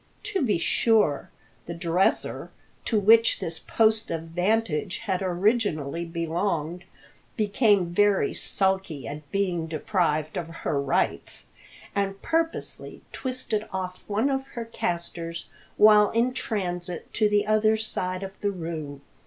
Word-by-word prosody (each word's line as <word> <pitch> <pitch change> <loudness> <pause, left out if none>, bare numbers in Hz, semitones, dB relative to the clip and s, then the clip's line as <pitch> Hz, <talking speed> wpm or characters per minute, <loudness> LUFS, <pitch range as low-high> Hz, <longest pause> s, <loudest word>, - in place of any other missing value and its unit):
To 420 -3 -1
be 225 -9 +2
sure, 210 -3 +2 0.4
the 170 - -5
dresser, 175 +2 0 0.4
to 220 - +2
which 225 +3 +5
this 165 0 -3
post 220 0 +2
of 165 -1 -3
vantage 180 0 0
had 190 -3 0
originally 180 - 0
belonged, 170 0 -2 0.5
became 205 -4 +2
very 205 +1 +3
sulky 190 -7 0
at 145 0 -8
being 180 -5 0
deprived 155 -1 0
of 165 - -3 0.2
her 140 -2 +1
rights, 140 -1 -1 0.5
and 195 -1 -1
purposely 330 0 -2
twisted 250 -5 -3
off 185 -1 -4
one 220 +7 +1
of 270 0 -2
her 235 - -3
castors 170 -5 -4 0.3
while 210 -1 +7
in 235 +2 +1
transit 180 -8 -4
to 215 -1 +2
the 205 0 +2
other 215 0 +3
side 185 -4 -3
of 195 0 -9
the 205 - +1
room. 160 -6 -5
190 Hz, 130 wpm, -26 LUFS, 170-215 Hz, 0.5 s, while